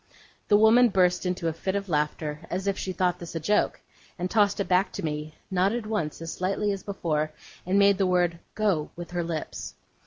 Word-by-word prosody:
The 205 - +6
woman 230 +3 +6
burst 180 -2 +2
into 180 -2 -1
a 165 - 0
fit 190 +4 -3
of 200 0 -2
laughter, 150 -1 -1
as 185 +2 -3
if 200 -1 +1
she 190 - -3
thought 180 -1 0
this 170 -1 -8
a - - 0
joke, 210 +7 +1 0.4
and 180 0 -3
tossed 205 -2 +3
it 200 - -1
back 185 +2 +3
to 195 - -4
me, 150 0 -4 0.2
nodded 195 +5 +1
once, 170 -8 -2
as 165 - -5
slightly 195 +3 0
as 195 -1 -3
before, 155 -6 -2 0.4
and 190 +2 +2
made 200 0 +5
the 195 - +3
word 175 -2 +2 0.2
'Go!' 195 -9 +1
with 175 0 -8
her 175 -1 -1
lips. 165 -2 -5
185 Hz, 210 wpm, -27 LUFS, 165-200 Hz, 0.4 s, The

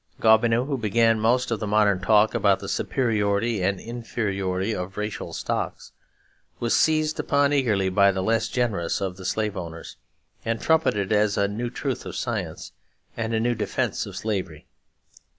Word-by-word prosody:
Gobineau, 115 +2 +4
who 140 -2 -2
began 115 +1 +2
most 120 +3 +2
of 115 - 0
the 105 - -3
modern 105 -2 +3
talk 105 +2 +4
about 100 -2 +3
the - - -7
superiority 110 -3 0
and 95 +1 0
inferiority 105 -4 -3
of 90 0 -5
racial 105 0 -4
stocks, - - -4 0.7
was 120 -1 +1
seized 155 -1 +2
upon 140 0 +2
eagerly 110 -9 +2
by 100 +1 +4
the 95 -1 -2
less 115 +2 +1
generous 110 -9 -1
of 95 -2 -3
the 95 - -9
slave 105 +1 -1
owners 85 -3 -7 0.5
and 115 0 -1
trumpeted 110 - +1
as 105 -1 +2
a 100 - +2
new 115 +4 -3
truth - - -4
of - - -7
science - - -4 0.4
and 115 0 -2
a - - +1
new 120 +2 +1
defence - - -2
of - - -9
slavery. 95 -8 -4
110 Hz, 165 wpm, -24 LUFS, 100-115 Hz, 0.7 s, Gobineau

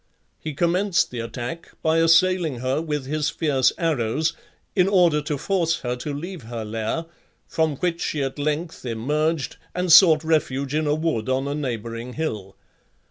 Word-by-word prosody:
He 155 -2 -6
commenced 180 +4 +1
the 125 - -5
attack 120 +8 -6
by 160 +1 +3
assailing 165 -2 +3
her 130 +4 0
with 150 -4 -3
his 150 +2 -1
fierce 140 -6 +2
arrows, 155 -1 0 0.4
in 185 -2 +4
order 175 -6 +4
to 150 0 -3
force 165 +1 0
her 125 0 -2
to 145 +4 -5
leave 170 +4 -6
her 115 -1 -6
lair, 110 +9 -3 0.4
from 160 -2 0
which 170 +3 -2
she 145 -2 -1
at 135 +1 -4
length 150 +3 -2
emerged, 145 +6 -1 0.2
and 180 -1 0
sought 160 -2 +8
refuge 140 -4 0
in 155 0 0
a 145 - +2
wood 155 -8 -1
on 130 +1 0
a 140 - -2
neighbouring 120 -3 -4
hill. 110 -11 -4
150 Hz, 165 wpm, -23 LUFS, 130-165 Hz, 0.4 s, sought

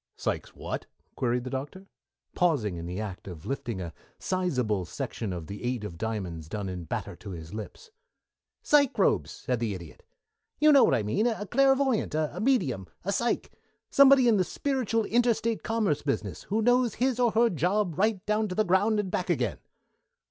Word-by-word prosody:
"Sike - - -2
whats?" - - -5 0.3
queried 125 -1 0
the 130 - -6
Doctor, 145 +9 -5 0.5
pausing 145 - +1
in 85 0 -6
the 90 +3 -4
act 100 -4 -6
of 85 -5 -9
lifting 130 -6 -3
a 85 -3 -6 0.2
sizable 125 - 0
section 100 +4 -5
of 85 -3 -5
the 100 +7 -8
eight 120 -2 -2
of 90 -6 -7
diamonds 95 -8 -4
done 105 0 -4
in 90 -2 -6
batter - - -4
to - - -10
his 80 -1 -8
lips. 110 - -8 0.7
"Psychrobes," 275 -8 +3
said 125 -2 -3
the 110 -4 -1
Idiot. 85 -4 -11 0.6
"You 305 +1 +6
know 275 -3 +7
what - - +4
I 115 - 0
mean 200 - +1
a 220 -3 -2
clairvoyant, 270 - +2
a 155 +3 -1
medium, 175 - +1 0.2
a 200 - 0
sike 235 +4 -1 0.4
somebody 275 -2 +7
in 225 -3 +5
the 185 - +3
spiritual 245 0 -1
inter 235 +1 +3
State 230 0 -2
commerce 220 -9 0
business, 105 - -2
who 215 +3 0
knows 245 -1 +3
his 255 -1 0
or 240 -3 +3
her 230 +1 +4
job 180 +2 0
right 210 -2 +1
down 215 +1 +1
to 180 - -5
the 215 - +2
ground 205 +4 +3
and 195 -3 -2
back 180 - -2
again." 125 - 0
180 Hz, 185 wpm, -28 LUFS, -, 0.7 s, know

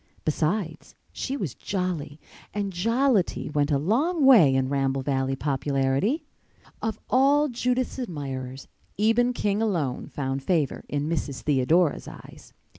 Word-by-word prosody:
Besides, 160 +2 -2 0.2
she 270 +1 -3
was 170 - -3
"jolly," 180 -6 -3 0.4
and 200 -2 -2
jollity 230 - +1
went 145 -1 +1
a 145 - +3
long 275 - +1
way 190 - +7
in 130 -1 +1
Ramble 135 -1 0
Valley 135 -1 0
popularity. 140 - 0 0.6
Of 225 -1 -2
all 285 +3 +4
Judith's 250 +1 -1
admirers 135 - -5 0.3
Eben 225 +4 +3
King 210 -3 -1
alone 170 - -1
found 135 -1 -3
favor 155 -2 0
in 145 0 -1
Mrs. 145 -4 -3
Theodora's 150 +4 +2
eyes. - - -12
165 Hz, 125 wpm, -25 LUFS, 140-225 Hz, 0.6 s, way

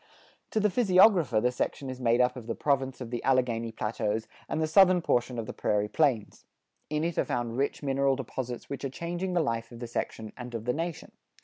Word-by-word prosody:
To 220 - 0
the 210 -1 +2
physiographer 185 - +5
the 125 +3 +2
section 135 +2 -3
is 130 0 -6
made 120 0 +3
up 125 +1 +2
of 120 -3 -9
the 115 - -2
province 135 -2 0
of 120 -2 -6
the 120 - -3
Alleghany 120 -3 +1
Plateaus 110 0 -2 0.2
and - - -1
the 160 - +2
southern 185 +3 +6
portion 120 -2 +1
of 115 - -3
the - - -6
Prairie 105 0 0
Plains. 130 -8 0 0.5
In 150 +1 -1
it 170 -1 -1
are - - +4
found 120 -1 -2
rich 140 +3 -1
mineral 135 0 +2
deposits 125 -2 -5
which 140 - -6
are 135 - -1
changing 175 +6 -4
the 175 -2 +2
life 115 -3 -2
of 120 - -9
the 120 - -6
section 110 -2 -4
and 125 -1 -7
of 115 -1 -5
the 125 - +1
nation. 165 +2 -4
130 Hz, 220 wpm, -29 LUFS, 115-155 Hz, 0.5 s, southern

